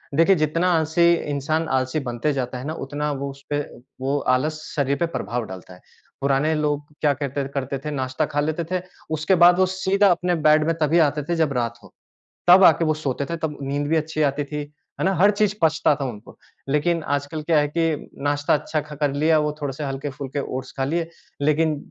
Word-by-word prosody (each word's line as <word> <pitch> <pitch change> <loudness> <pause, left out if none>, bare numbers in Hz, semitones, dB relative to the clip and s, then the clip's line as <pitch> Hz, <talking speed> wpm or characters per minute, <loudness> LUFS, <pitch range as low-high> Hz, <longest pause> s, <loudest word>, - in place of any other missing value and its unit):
देखिए, 165 +5 +5
जितना 165 +3 +1
आलसी 165 +1 +3
इंसान 155 +1 -1
आलसी 130 +3 0
बनते 120 +5 -1
जाता 130 -2 -3
है 125 - -7
ना, 155 - -2
उतना 150 0 -3
वो 140 0 -3
उसपे, 140 +1 -4 0.4
वो 135 +2 0 0.2
आलस 155 +4 -2
शरीर 140 -1 +1
पे 170 - +1
प्रभाव 115 +3 -3
डालता 95 -1 -10
है। 90 - -16 0.4
पुराने 140 +3 +2
लोग 150 -1 -1 0.2
क्या 150 -2 +3
कहते 140 0 -3
और 135 - -3
करते 135 0 -2
थे, 150 - -2
नाश्ता 130 +1 -1
खा 145 - +1
लेते 155 +3 -1
थे, 185 -1 0 0.4
उसके 155 +5 +2
बाद 175 +1 +7
वो 185 - +5
सीधा 195 +2 +2
अपने 180 0 +1
बेड 155 0 +5
में 165 - +1
तभी 155 +3 +3
आते 150 -1 +2
थे, 170 +4 -2
जब 160 -4 +1
रात 120 -1 -2
हो। 100 - -16 0.6
तब 185 +2 +8
आके 165 0 +6
वो 155 -1 +2
सोते 140 -3 -2
थे। 170 - -1
तब 160 -2 -4
नींद 140 +1 -2
भी 160 - +2
अच्छी 155 0 -1
आती 145 +1 -3
थी। 150 +1 -4 0.4
है - - +1
ना? 195 - +2
हर 190 +4 +5
चीज़ 210 -1 +1
पचता 160 -2 +3
था 140 - -3
उनको। 115 -4 -8 0.3
लेकिन 155 +4 +1
आजकल 145 +2 -3
क्या 160 0 +2
है 145 0 +2
कि 165 -2 0
नाश्ता 145 0 +1
अच्छा 155 +1 -1
ख 150 +1 -12
कर 145 -2 +1
लिया, 155 +3 +3
वो 150 0 0
थोड़े-से 145 0 -4
हल्के-फुल्के 135 0 -4 0.2
ओट्स 130 0 -6
खा 135 - 0
लिए, 165 +4 -1 0.3
लेकिन 155 +1 +2
150 Hz, 215 wpm, -23 LUFS, 140-160 Hz, 0.6 s, तब